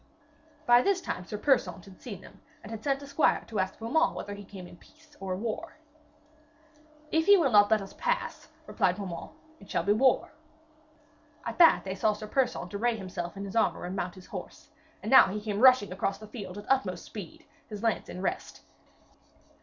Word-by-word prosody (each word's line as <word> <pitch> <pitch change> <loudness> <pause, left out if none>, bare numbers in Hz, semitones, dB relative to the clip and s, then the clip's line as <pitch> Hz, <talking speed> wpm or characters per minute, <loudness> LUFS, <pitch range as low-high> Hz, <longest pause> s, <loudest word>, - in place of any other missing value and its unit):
By 240 0 +6
this 395 +5 +2
time 180 - -5
Sir 210 +5 -5
Persaunt 205 -8 +1
had 190 -2 -15
seen 205 -7 -8
them, - - -16 0.2
and 210 - -10
had 220 -1 -7
sent 275 0 0
a - - -7
squire 280 +2 +2
to 215 -3 -4
ask 190 0 -1
Beaumains 320 +9 +1
whether 205 - -5
he 205 0 -9
came 190 -2 -10
in 175 - -13
peace 305 - -22
or 190 -1 -3
war. 235 - -5 1.3
'If 320 +2 +1
he 405 0 +8
will 315 -8 +2
not 205 -1 +6
let 220 -2 +3
us 195 - -11
pass,' - - -2 0.2
replied 180 - +1
Beaumains, 185 -4 -6 0.3
'it 200 - -16
shall - - 0
be 205 - +3
war.' 255 +4 +3 1.1
At - - -5
that 335 - +7
they 190 - -4
saw 210 +3 +1
Sir 210 +1 -8
Persaunt 240 -6 -1
array 225 +3 0
himself 185 -1 -6
in 200 - -5
his 195 - -8
armour 225 -5 +1
and 180 +2 -5
mount 180 -2 -3
his 185 - -13
horse, - - -9 0.3
and - - -3
now 265 - +9
he 200 +3 -3
came 210 -1 -3
rushing 255 -6 +6
across 195 +1 -2
the 215 - -11
field 205 -3 -8
at 205 - -8
utmost 200 -10 0
speed, 200 -7 -10 0.2
his 210 0 -7
lance 225 -2 0
in 185 - -6
rest. - - -3
210 Hz, 200 wpm, -29 LUFS, 190-255 Hz, 1.3 s, now